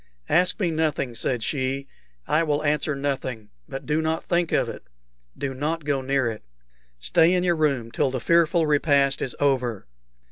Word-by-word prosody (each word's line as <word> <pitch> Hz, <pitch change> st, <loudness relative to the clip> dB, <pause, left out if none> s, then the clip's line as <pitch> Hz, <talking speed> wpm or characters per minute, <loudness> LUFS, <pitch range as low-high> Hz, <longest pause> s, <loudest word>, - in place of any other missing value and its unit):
"Ask 180 Hz, +6 st, +3 dB
me 180 Hz, -5 st, +1 dB
nothing," 155 Hz, -5 st, -1 dB
said 115 Hz, 0 st, -1 dB
she. 135 Hz, +1 st, -2 dB, 0.4 s
"I 155 Hz, -, +3 dB
will 150 Hz, -2 st, 0 dB
answer 150 Hz, 0 st, 0 dB
nothing; 130 Hz, -6 st, -3 dB, 0.2 s
but 135 Hz, 0 st, -6 dB
do 150 Hz, +3 st, +1 dB
not 160 Hz, +1 st, -2 dB
think 175 Hz, -1 st, 0 dB
of -, -, +2 dB
it. -, -, -7 dB, 0.6 s
Do 135 Hz, -1 st, -3 dB
not 150 Hz, +4 st, -3 dB
go 140 Hz, -2 st, 0 dB
near 135 Hz, 0 st, 0 dB
it. 110 Hz, -, -9 dB, 0.5 s
Stay 110 Hz, -, +3 dB
in 180 Hz, -, +1 dB
your 175 Hz, -1 st, +2 dB
room 140 Hz, -7 st, 0 dB
till 140 Hz, +2 st, +1 dB
the 130 Hz, 0 st, -3 dB
fearful 170 Hz, +3 st, +3 dB
repast 140 Hz, -2 st, +2 dB
is 130 Hz, -, -3 dB
over." 125 Hz, -, 0 dB
145 Hz, 175 wpm, -24 LUFS, 130-160 Hz, 0.6 s, Ask